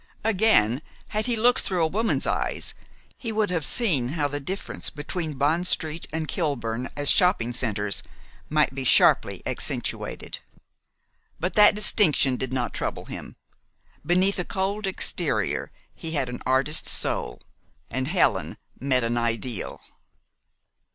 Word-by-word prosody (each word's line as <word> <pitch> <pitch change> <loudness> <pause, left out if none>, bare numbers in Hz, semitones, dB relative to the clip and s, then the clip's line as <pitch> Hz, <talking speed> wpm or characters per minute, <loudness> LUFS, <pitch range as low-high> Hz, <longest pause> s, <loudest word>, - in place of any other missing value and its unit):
Again, 195 - +3 0.3
had 215 +3 -1
he 240 - +1
looked 240 +3 +3
through 180 -3 -1
a - - +3
woman's 220 +7 0
eyes, - - -2 0.5
he 230 -5 -4
would 215 -3 0
have 165 -3 -1
seen 160 - +2
how 145 -2 +1
the 145 0 -4
difference 185 +8 -3
between 155 +2 -5
Bond 160 +6 +1
st. 160 0 +1
and 160 0 -3
Kilburn 125 -8 -2
as 145 -1 +4
shopping 180 - +2
centers 105 -4 0 0.5
might 150 -3 +2
be 135 0 -4
sharply 125 - +3
accentuated. - - -3 1.0
But 180 +3 -2
that 210 -1 +6
distinction 175 - +5
did 130 0 -3
not 125 -2 -2
trouble - - -4
him. - - -8 0.7
Beneath 185 +5 +2
a - - 0
cold 195 +3 -2
exterior 190 - -1 0.2
he 165 -2 -5
had 135 -5 -1
an 125 - -7
artist's 135 +4 +3
soul, - - +1 0.5
and 130 +2 -2
"Helen" 175 +3 +1 0.2
met 130 -2 +1
an 120 +1 0
ideal. 115 -2 -3
155 Hz, 135 wpm, -25 LUFS, 130-190 Hz, 1.0 s, that